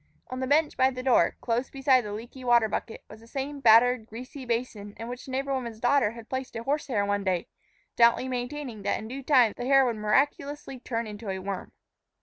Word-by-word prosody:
On 255 Hz, -, -4 dB
the 260 Hz, -, -2 dB
bench 295 Hz, +2 st, +2 dB
by 260 Hz, -, +4 dB
the 255 Hz, -1 st, -6 dB
door, 245 Hz, -10 st, +3 dB
close 240 Hz, +2 st, -1 dB
beside 270 Hz, -1 st, +3 dB
the 210 Hz, -, -6 dB
leaky 235 Hz, +5 st, -8 dB
water 240 Hz, -2 st, +4 dB
bucket, 225 Hz, -, -5 dB
was 215 Hz, -, -13 dB
the 230 Hz, -, -17 dB
same 280 Hz, +3 st, -4 dB
battered, 235 Hz, -1 st, +5 dB
greasy 255 Hz, +4 st, -9 dB
basin 230 Hz, -4 st, -3 dB
in 230 Hz, -, -6 dB
which 245 Hz, +1 st, -7 dB
the 265 Hz, -, -9 dB
neighbor 275 Hz, +1 st, -1 dB
woman's 235 Hz, -4 st, -4 dB
daughter 245 Hz, -2 st, +2 dB
had 230 Hz, -1 st, -11 dB
placed 260 Hz, -2 st, -5 dB
a 230 Hz, -, -4 dB
horse 285 Hz, +4 st, -1 dB
hair 210 Hz, -7 st, 0 dB
one 205 Hz, 0 st, -1 dB
day, 185 Hz, -3 st, 0 dB, 0.5 s
stoutly 235 Hz, +2 st, +4 dB
maintaining 250 Hz, -2 st, -4 dB
that 200 Hz, -, 0 dB
in 220 Hz, -, -7 dB
due 265 Hz, +4 st, -6 dB
time 255 Hz, -6 st, +4 dB
the 245 Hz, -, -4 dB
hair 270 Hz, -1 st, +6 dB
would 235 Hz, -3 st, -1 dB
miraculously 275 Hz, +5 st, 0 dB
turn 235 Hz, -1 st, -3 dB
into 210 Hz, 0 st, -7 dB
a 190 Hz, -, -2 dB
worm. 190 Hz, 0 st, -5 dB
245 Hz, 220 wpm, -27 LUFS, 220-265 Hz, 0.5 s, hair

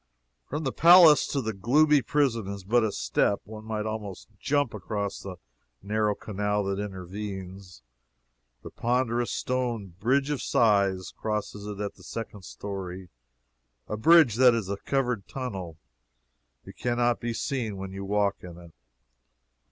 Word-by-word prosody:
From 150 Hz, +3 st, -3 dB
the 135 Hz, -, -1 dB
palace 170 Hz, -1 st, +7 dB
to 140 Hz, -2 st, -2 dB
the 110 Hz, 0 st, -2 dB
gloomy 145 Hz, +9 st, +4 dB
prison 130 Hz, -8 st, 0 dB
is 100 Hz, -1 st, -6 dB
but 115 Hz, +5 st, +2 dB
a 110 Hz, -, 0 dB
step 100 Hz, -, 0 dB
one 110 Hz, +1 st, -10 dB
might 110 Hz, -1 st, -3 dB
almost 110 Hz, -3 st, -6 dB
jump 145 Hz, -4 st, 0 dB
across 100 Hz, -1 st, -4 dB
the 95 Hz, -2 st, -7 dB, 0.5 s
narrow 105 Hz, 0 st, 0 dB
canal 105 Hz, 0 st, -2 dB
that 100 Hz, 0 st, -2 dB
intervenes. 95 Hz, -, -7 dB, 0.8 s
The -, -, -9 dB
ponderous 120 Hz, 0 st, 0 dB
stone 120 Hz, -7 st, -2 dB
Bridge 135 Hz, +6 st, +1 dB
of 145 Hz, -, -2 dB
Sighs 100 Hz, -5 st, +2 dB
crosses 105 Hz, -1 st, -4 dB
it 105 Hz, -1 st, -6 dB
at 105 Hz, -1 st, -3 dB
the -, -, -18 dB
second 105 Hz, -4 st, -7 dB
story 95 Hz, -2 st, -7 dB, 0.8 s
a -, -, -3 dB
bridge 135 Hz, -1 st, +5 dB
that 125 Hz, -2 st, +6 dB
is 110 Hz, -5 st, -3 dB
a 100 Hz, -, -2 dB
covered 125 Hz, -4 st, -1 dB
tunnel 95 Hz, -, -6 dB, 0.9 s
you -, -, -10 dB
can 120 Hz, -1 st, -2 dB
not 120 Hz, 0 st, +2 dB
be 120 Hz, -, -3 dB
seen 115 Hz, -3 st, -3 dB
when 95 Hz, 0 st, -6 dB
you 95 Hz, +1 st, -6 dB
walk 100 Hz, 0 st, +1 dB
in 85 Hz, -2 st, -10 dB
it. 85 Hz, -2 st, -14 dB
105 Hz, 150 wpm, -27 LUFS, 100-125 Hz, 0.9 s, palace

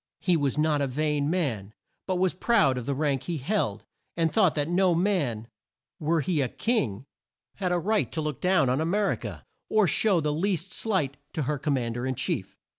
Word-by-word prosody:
He 180 Hz, -2 st, +2 dB
was 145 Hz, -3 st, 0 dB
not 150 Hz, -1 st, +2 dB
a 140 Hz, -, +1 dB
vain 150 Hz, +2 st, 0 dB
man, 120 Hz, -, -2 dB, 0.3 s
but 185 Hz, -, 0 dB
was 185 Hz, 0 st, +1 dB
proud 180 Hz, -, +3 dB
of 120 Hz, -, -8 dB
the 140 Hz, -, 0 dB
rank 140 Hz, -2 st, 0 dB
he 170 Hz, +1 st, -2 dB
held, 130 Hz, -, -1 dB, 0.3 s
and 165 Hz, -1 st, +1 dB
thought 190 Hz, -8 st, +3 dB
that 145 Hz, -1 st, 0 dB
no 180 Hz, 0 st, +3 dB
man 155 Hz, -, 0 dB, 0.5 s
were 160 Hz, +1 st, +1 dB
he 155 Hz, -1 st, 0 dB
a 130 Hz, -, 0 dB
king 135 Hz, -, -1 dB, 0.5 s
had 185 Hz, -3 st, -1 dB
a 180 Hz, -, +2 dB
right 210 Hz, +5 st, 0 dB
to 165 Hz, -, -2 dB
look 150 Hz, -4 st, -3 dB
down 180 Hz, -6 st, +3 dB
on 130 Hz, +4 st, +1 dB
A -, -, 0 dB
mer 200 Hz, +3 st, +1 dB
i -, -, 0 dB
ca, -, -, -8 dB, 0.3 s
or 215 Hz, -2 st, +4 dB
show 190 Hz, +3 st, +4 dB
the 150 Hz, -1 st, 0 dB
least 180 Hz, +2 st, -1 dB
slight 180 Hz, -11 st, -1 dB, 0.2 s
to 155 Hz, -, -1 dB
her 145 Hz, +1 st, -2 dB
Com 145 Hz, 0 st, 0 dB
mand 120 Hz, -2 st, -2 dB
er 120 Hz, +2 st, -2 dB
in 130 Hz, -, -1 dB
chief. -, -, -2 dB
155 Hz, 215 wpm, -27 LUFS, 135-185 Hz, 0.5 s, or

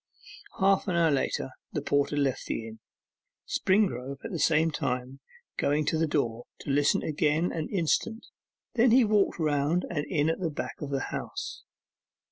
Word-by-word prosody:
Half 195 Hz, +1 st, +3 dB
an 180 Hz, -, 0 dB
hour 165 Hz, -2 st, +4 dB
later 135 Hz, -1 st, -1 dB, 0.2 s
the 150 Hz, -, -1 dB
porter 145 Hz, +1 st, +1 dB
left 135 Hz, -2 st, 0 dB
the 115 Hz, -, -3 dB
inn, 110 Hz, 0 st, -10 dB, 0.7 s
Springrove 140 Hz, -, +1 dB
at 230 Hz, -, -5 dB
the 170 Hz, -, -3 dB
same 160 Hz, +1 st, +3 dB
time 125 Hz, -1 st, -3 dB, 0.4 s
going 150 Hz, +1 st, +1 dB
to 160 Hz, -, +1 dB
the 160 Hz, -, +2 dB
door 120 Hz, -6 st, -1 dB, 0.2 s
to -, -, -3 dB
listen 145 Hz, +1 st, +3 dB
again 155 Hz, +2 st, +1 dB
an 160 Hz, -2 st, -3 dB
instant, 200 Hz, +5 st, 0 dB, 0.5 s
then 245 Hz, +1 st, +4 dB
he 245 Hz, +1 st, +6 dB
walked 210 Hz, -2 st, +2 dB
round 155 Hz, +2 st, +1 dB
and 150 Hz, -4 st, -1 dB
in 150 Hz, -4 st, +1 dB
at 165 Hz, -, -4 dB
the 175 Hz, -3 st, -1 dB
back 150 Hz, -, -6 dB
of 145 Hz, -, -4 dB
the 135 Hz, -1 st, -2 dB
house. -, -, -5 dB
150 Hz, 170 wpm, -28 LUFS, 140-175 Hz, 0.7 s, he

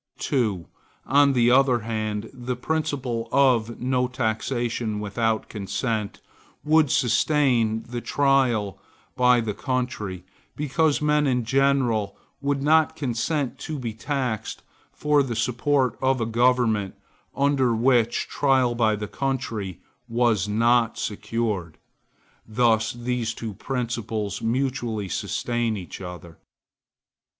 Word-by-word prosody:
2. 105 Hz, -10 st, -1 dB, 0.4 s
On 140 Hz, +1 st, +4 dB
the 120 Hz, -1 st, +4 dB
other 130 Hz, -2 st, +4 dB
hand, 110 Hz, -1 st, -3 dB
the 125 Hz, -1 st, -4 dB
principle 130 Hz, -5 st, -2 dB
of 120 Hz, -5 st, +2 dB
no 125 Hz, 0 st, +1 dB
taxation 120 Hz, -2 st, -2 dB
without 110 Hz, +2 st, -1 dB
consent 105 Hz, +1 st, -3 dB, 0.4 s
would 155 Hz, -1 st, +4 dB
sustain 120 Hz, -3 st, +2 dB
the 120 Hz, 0 st, -6 dB
trial 130 Hz, -9 st, +1 dB, 0.4 s
by 125 Hz, -1 st, +4 dB
the 110 Hz, -3 st, -2 dB
country, 110 Hz, -7 st, -3 dB, 0.3 s
because 150 Hz, +1 st, +1 dB
men 150 Hz, -1 st, +3 dB
in 125 Hz, -3 st, 0 dB
general 125 Hz, -5 st, +1 dB, 0.2 s
would 140 Hz, -1 st, -1 dB
not 155 Hz, +1 st, +3 dB
consent 135 Hz, +2 st, -2 dB
to 155 Hz, -, -5 dB
be 120 Hz, -4 st, -4 dB
taxed 125 Hz, -2 st, -3 dB, 0.3 s
for 150 Hz, -1 st, +2 dB
the 125 Hz, -4 st, -2 dB
support 130 Hz, +3 st, +1 dB
of 130 Hz, 0 st, +2 dB
a 115 Hz, -, 0 dB
government 115 Hz, -3 st, +1 dB, 0.4 s
under 135 Hz, -4 st, +2 dB
which 120 Hz, -1 st, +2 dB
trial 130 Hz, -4 st, +2 dB
by 110 Hz, -2 st, +2 dB
the 105 Hz, 0 st, -5 dB
country 115 Hz, -9 st, -3 dB, 0.3 s
was 115 Hz, -4 st, +2 dB
not 115 Hz, +2 st, +2 dB
secured. 105 Hz, -5 st, -3 dB, 0.7 s
Thus 110 Hz, -1 st, +2 dB
these 120 Hz, -1 st, -3 dB
two 110 Hz, -3 st, -5 dB
principles 115 Hz, -4 st, -3 dB
mutually 120 Hz, -4 st, -1 dB
sustain 120 Hz, +3 st, -1 dB
each 90 Hz, -4 st, -8 dB
other. 90 Hz, -3 st, -9 dB
120 Hz, 115 wpm, -24 LUFS, 110-135 Hz, 0.7 s, On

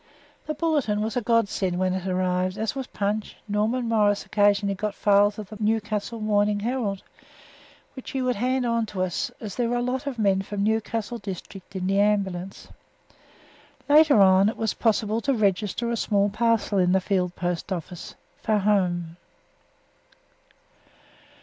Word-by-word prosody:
The 305 Hz, -, -2 dB
Bulletin 285 Hz, -10 st, 0 dB
was 220 Hz, 0 st, -3 dB
a 245 Hz, -, +1 dB
God 230 Hz, -1 st, +2 dB
send 185 Hz, -3 st, -2 dB
when 185 Hz, 0 st, +1 dB
it 190 Hz, 0 st, -3 dB
arrived, 185 Hz, +1 st, 0 dB
as 220 Hz, 0 st, -2 dB
was 265 Hz, -2 st, -4 dB
Punch. 210 Hz, +1 st, -3 dB
Norman 220 Hz, +4 st, 0 dB
Morris 210 Hz, -3 st, +2 dB
occasionally 205 Hz, -1 st, +2 dB
got 210 Hz, +1 st, -3 dB
files 205 Hz, 0 st, +3 dB
of 210 Hz, -3 st, -7 dB
the 215 Hz, -, -9 dB
Newcastle 215 Hz, +1 st, -1 dB
Morning 205 Hz, -1 st, +1 dB
Herald, 225 Hz, -4 st, -2 dB, 0.9 s
which 260 Hz, -, -9 dB
he 265 Hz, -, -2 dB
would 250 Hz, -2 st, 0 dB
hand 255 Hz, +3 st, 0 dB
on 230 Hz, -1 st, 0 dB
to 190 Hz, -3 st, -2 dB
us, 180 Hz, -2 st, -2 dB
as 210 Hz, -3 st, -6 dB
there 240 Hz, -2 st, 0 dB
were 245 Hz, -, 0 dB
a 240 Hz, -, 0 dB
lot 260 Hz, +3 st, -2 dB
of 270 Hz, -3 st, -3 dB
men 195 Hz, -3 st, +2 dB
from 200 Hz, +1 st, -3 dB
the 215 Hz, -, +3 dB
Newcastle 225 Hz, +1 st, -3 dB
district 195 Hz, 0 st, -9 dB
in 185 Hz, -1 st, -3 dB
the 195 Hz, +1 st, +1 dB
Ambulance. 195 Hz, -3 st, -1 dB, 1.2 s
Later 295 Hz, -4 st, +6 dB
on 190 Hz, +1 st, +6 dB
it -, -, -6 dB
was 220 Hz, -2 st, -1 dB
possible 220 Hz, 0 st, 0 dB
to 275 Hz, +2 st, +1 dB
register 210 Hz, +2 st, 0 dB
a -, -, 0 dB
small 205 Hz, -2 st, +1 dB
parcel 220 Hz, -2 st, +1 dB
in 180 Hz, 0 st, +3 dB
the 190 Hz, -, +4 dB
Field 180 Hz, -2 st, -1 dB
Post 175 Hz, +1 st, -3 dB
Office 175 Hz, -1 st, -6 dB, 0.3 s
for 215 Hz, -, +1 dB
home. 180 Hz, -5 st, 0 dB
210 Hz, 170 wpm, -25 LUFS, 195-230 Hz, 1.2 s, Later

